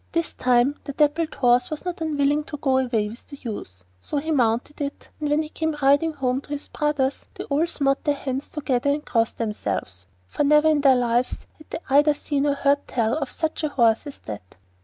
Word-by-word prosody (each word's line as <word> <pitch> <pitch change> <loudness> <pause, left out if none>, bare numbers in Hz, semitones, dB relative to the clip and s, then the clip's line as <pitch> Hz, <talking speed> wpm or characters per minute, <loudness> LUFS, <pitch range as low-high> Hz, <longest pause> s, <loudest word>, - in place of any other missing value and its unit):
This 335 -1 -1
time 250 +3 +2
the 280 - -5
dappled 305 +3 +1
horse 245 -1 +3
was 310 +3 -5
not 360 0 -4
unwilling 295 -1 +1
to 300 - -6
go 265 -2 +2
away 235 -5 0
with 225 +4 -10
the 285 - -10
youth, 95 - -7 0.2
so 295 - -4
he 315 +3 -2
mounted 245 +1 0
it, 280 0 -5
and 300 -1 -2
when 300 +2 +2
he 305 - -8
came 320 -1 -2
riding 285 +4 +3
home 260 -2 -1
to - - -20
his 290 0 -5
brothers 290 -3 -1
they - - -5
all 300 +4 +1
smote 275 -4 0
their 290 -1 +1
hands 270 0 -4
together 270 -3 -1
and 295 +1 0
crossed 230 -2 0
themselves, 100 - -3 0.2
for 195 - -1
never 300 +2 +5
in 300 -2 +3
their 270 -2 +6
lives 245 0 0
had 310 - -17
they - - -3
either 295 +2 +5
seen 290 0 -1
or 285 - +2
heard 285 0 +1
tell 230 -1 0
of 275 - -3
such 320 0 -3
a 305 - +1
horse 235 -2 +2
as 285 - -8
that. 100 -4 -8
280 Hz, 220 wpm, -24 LUFS, 245-300 Hz, 0.2 s, their